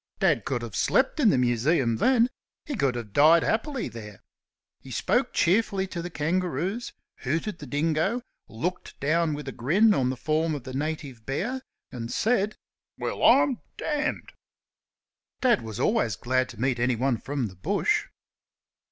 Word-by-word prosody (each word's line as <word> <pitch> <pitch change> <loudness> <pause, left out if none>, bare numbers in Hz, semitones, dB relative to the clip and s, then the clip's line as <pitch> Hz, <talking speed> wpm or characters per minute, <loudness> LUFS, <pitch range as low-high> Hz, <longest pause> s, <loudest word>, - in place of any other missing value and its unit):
Dad 155 - +2
could 125 -3 -2
have 115 -4 -7
slept 270 +4 +2
in 245 -7 +5
the 185 - +3
Museum 120 0 +2
then 240 - +4 0.4
he 290 - -4
could 135 - +1
have 115 -4 -6
died 160 +3 +6
happily 265 +4 -1
there. 105 -4 -10 0.6
He - - -14
spoke - - 0
cheerfully 195 +1 +2
to 175 - -4
the 175 - -5
kangaroos, 180 - -2 0.3
hooted 165 +8 -2
the - - -8
dingo, 160 +10 0 0.3
looked 170 +12 -4
down 155 +2 +1
with 145 -1 -7
a - - -3
grin 190 - +3
on 130 -8 +1
the 130 - -3
form 155 +3 0
of 140 - -6
the 130 0 -8
native 140 -4 -4
bear, 220 - -2 0.3
and 120 -3 -6
said, 215 -2 +1 0.4
"Well, - - -3
I'm 270 -3 +5 0.2
d - - -6 0.3
d!" - - -10 1.2
Dad 245 -5 +4
was 110 0 -7
always 130 - +1
glad 130 +3 0
to 120 -4 -11
meet 125 0 0
anyone 125 +1 +1
from 140 -2 -2
the 95 -4 -7
Bush. 90 - 0
150 Hz, 160 wpm, -26 LUFS, 125-195 Hz, 1.2 s, died